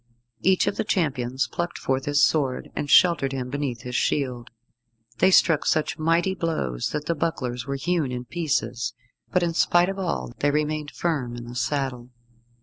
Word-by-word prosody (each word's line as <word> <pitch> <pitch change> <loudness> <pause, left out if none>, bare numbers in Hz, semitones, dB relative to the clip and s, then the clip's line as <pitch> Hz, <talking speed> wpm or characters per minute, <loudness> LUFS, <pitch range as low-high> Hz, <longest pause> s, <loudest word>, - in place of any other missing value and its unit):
Each 185 0 +3
of 200 +1 -1
the - - +1
champions 135 - 0
plucked 175 +7 -3
forth 130 0 -1
his 145 0 +3
sword, 135 -5 +1
and 145 - -3
sheltered 150 -7 +5
him 125 -2 -4
beneath 140 -5 -3
his 125 0 -5
shield. 125 -4 -1 0.7
They - - +5
struck 165 -4 +4
such 155 0 0
mighty 165 +4 +2
blows 155 - -2
that 150 0 -3
the 170 - +1
bucklers 130 -6 -3
were 140 - -2
hewn 155 -1 0
in 125 0 -4
pieces, 125 -6 -2 0.4
but 180 - +2
in 170 -1 0
spite 175 +2 +3
of 195 0 -4
all 170 -9 -3
they 145 - +2
remained 150 0 -1
firm 140 -10 -2
in 120 - -7
the 120 - -9
saddle. 125 -2 -2
145 Hz, 175 wpm, -25 LUFS, 125-165 Hz, 0.7 s, sheltered